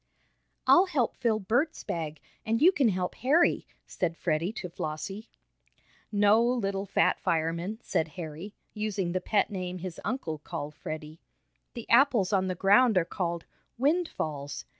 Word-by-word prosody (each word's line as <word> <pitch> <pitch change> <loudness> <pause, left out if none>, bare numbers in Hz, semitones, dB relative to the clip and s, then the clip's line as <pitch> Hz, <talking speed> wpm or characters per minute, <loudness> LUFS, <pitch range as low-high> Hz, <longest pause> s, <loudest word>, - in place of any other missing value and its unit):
"I'll 365 +2 +6
help 280 -10 0
fill 230 -4 +1
Bert's 245 - 0
bag, 155 -2 -4 0.2
and 225 0 0
you 345 +7 +7
can 275 -10 +2
help 180 -2 -1
Harry," 300 +7 +2 0.2
said 170 -2 -2
Freddie 165 +2 0
to 190 - -5
Flossie. 180 +6 -5 0.8
"No, 205 +2 +4
little 200 -5 -1
fat - - +2
fireman," 170 +5 -1
said 160 - 0
Harry, 170 +4 -7 0.2
using 210 -4 -2
the 185 +1 -1
pet 210 +2 +1
name 185 -2 -4
his 180 -2 -7
uncle 175 - -3
called 150 -1 -6
Freddie. 155 +1 -7 0.6
"The 235 - -7
apples 235 -6 +4
on 190 -1 +2
the 185 - -2
ground 205 +4 +5
are 175 - +3
called 170 -1 -3 0.3
'windfalls.' 235 - -1
195 Hz, 145 wpm, -28 LUFS, 170-230 Hz, 0.8 s, you